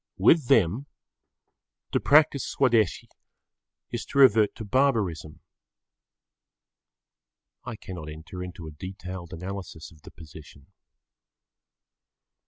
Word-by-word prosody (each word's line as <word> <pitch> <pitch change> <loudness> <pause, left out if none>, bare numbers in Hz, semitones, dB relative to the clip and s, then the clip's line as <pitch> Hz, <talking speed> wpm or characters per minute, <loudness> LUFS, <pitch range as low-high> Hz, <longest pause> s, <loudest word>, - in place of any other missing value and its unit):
With 155 -7 +4
them 110 - +2 1.0
to - - +1
practise 145 -2 +4
Swadeshi 115 -7 +1 0.8
is - - -4
to 140 - -6
revert 115 -6 +5
to 110 - -7
barbarism. 100 - 0 2.2
I 120 -2 -6
cannot 90 -6 -9
enter 80 +4 -9
into 90 -2 -9
a 80 - -8
detailed 90 +2 -8
analysis 90 -2 -8
of 80 -2 -20
the - - -13
position. 75 -1 -15
95 Hz, 95 wpm, -26 LUFS, 80-115 Hz, 2.2 s, revert